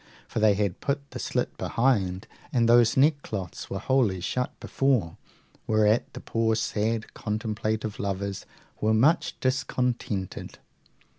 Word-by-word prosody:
For - - -3
they 105 -2 +5
had 100 -3 -1
put 140 0 -2
the - - -6
slit - - -2
behind, 100 -7 +1 0.3
and 115 -2 +3
those 120 -1 +5
neckcloths 130 - 0
were - - -3
wholly 120 -8 +1
shut 125 +7 -3
before, 125 -12 +1 0.5
whereat 110 +1 +3
the - - -7
poor 115 -1 0
sad 110 0 -1
contemplative 110 0 -3
lovers 100 0 -3 0.3
were 110 +1 +2
much 145 +10 +2
discontented. 125 -7 -2
110 Hz, 125 wpm, -27 LUFS, 100-125 Hz, 0.5 s, they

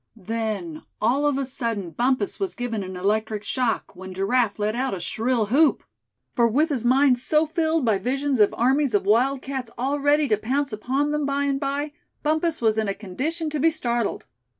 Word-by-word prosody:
Then, 210 -6 -4 0.2
all 265 +7 +2
of 285 -2 +1
a 275 - -1
sudden, 230 -8 -3
Bumpus 245 0 0
was 390 -2 -2
given 240 -4 -3
an 185 -1 -6
electric 215 +2 -1
shock, 245 -4 -1
when 185 +1 -9
Giraffe 205 +3 +1
let 210 +1 -1
out 260 -3 -1
a - - -6
shrill 225 +6 0
whoop; 290 +5 +3 0.5
for 235 -2 +3
with 295 +8 +2
his 265 -6 -1
mind 255 +1 +4
so 305 +5 +2
filled 320 -2 0
by 215 -4 +2
visions 270 +2 -1
of 210 - +5
armies 265 0 +2
of 200 - +1
wildcats 260 +3 +1
all 275 +4 -1
ready 290 +1 +3
to 215 - +3
pounce 265 +4 -1
upon 265 +7 -1
them 300 -1 0
by 280 0 0
and 275 -1 0
by, 285 +1 -2 0.3
Bumpus 315 -1 0
was 220 -1 +3
in 215 - 0
a 195 - -1
condition 285 - -3
to 300 - -2
be 325 +4 +4
startled. 240 -8 -2
250 Hz, 195 wpm, -24 LUFS, 215-285 Hz, 0.5 s, of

